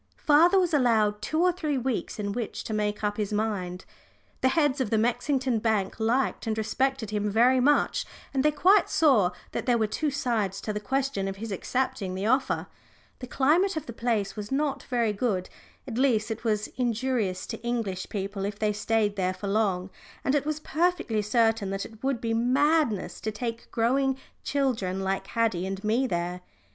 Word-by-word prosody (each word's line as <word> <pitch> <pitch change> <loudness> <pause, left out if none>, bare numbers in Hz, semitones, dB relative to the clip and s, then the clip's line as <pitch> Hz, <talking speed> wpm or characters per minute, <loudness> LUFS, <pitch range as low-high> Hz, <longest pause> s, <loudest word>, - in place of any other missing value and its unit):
Father 335 +6 +5
was 355 -3 +1
allowed 220 -6 +3
two 315 +10 0
or 360 - +5
three 310 -5 -2
weeks 255 -2 -2
in 205 -1 -2
which 230 0 -4
to 220 - -5
make 210 0 -1
up 205 0 0
his 210 -2 -2
mind. 200 -4 -2 0.6
The 260 - +4
heads 290 -1 +2
of 245 - -1
the 220 - +2
Mexington 250 +2 +1
bank 215 -2 0
liked 235 +2 0
and 220 0 -1
respected 255 +1 -1
him 210 0 0
very 245 +5 +4
much, 290 +3 +3 0.3
and 265 -1 +1
they 300 - +5
quite 365 +7 +4
saw 265 - +4 0.2
that - - -4
there 245 -1 +4
were 220 - +2
two 295 +8 -1
sides 225 -8 -1
to 215 - -3
the 210 - -2
question 255 -2 -1
of 195 - -3
his 220 +2 -6
accepting 195 -2 -2
the 190 +2 -3
offer. 260 +4 +1 0.5
The 250 - -7
climate 320 +9 +2
of 310 - -4
the 235 - -7
place 220 -4 -1
was 210 +1 -6
not 280 0 0
very 235 -4 +1
good 200 -4 -1 0.4
at 240 -2 -3
least 230 -5 +2
it 225 - -5
was 210 -2 0
injurious 235 -5 -1
to - - -6
English 225 -6 -2
people 200 -1 -4
if 200 0 -3
they 215 -1 +1
stayed 210 -1 0
there 185 -1 0
for 200 - -6
long 195 -3 0 0.3
and 270 - +2
it 290 0 +1
was 310 0 -1
perfectly 310 -9 0
certain 225 -1 +2
that 195 0 -3
it 220 +1 -13
would 270 -3 0
be 225 0 -1
madness 255 - +1
to 220 - -2
take 230 +1 -5
growing 265 +3 +1 0.3
children 225 -10 -1
like 190 0 -2
Haddie 215 -6 0
and 195 +1 -5
me 230 +5 +2
there. 175 -2 -2
225 Hz, 190 wpm, -27 LUFS, 205-265 Hz, 0.6 s, Father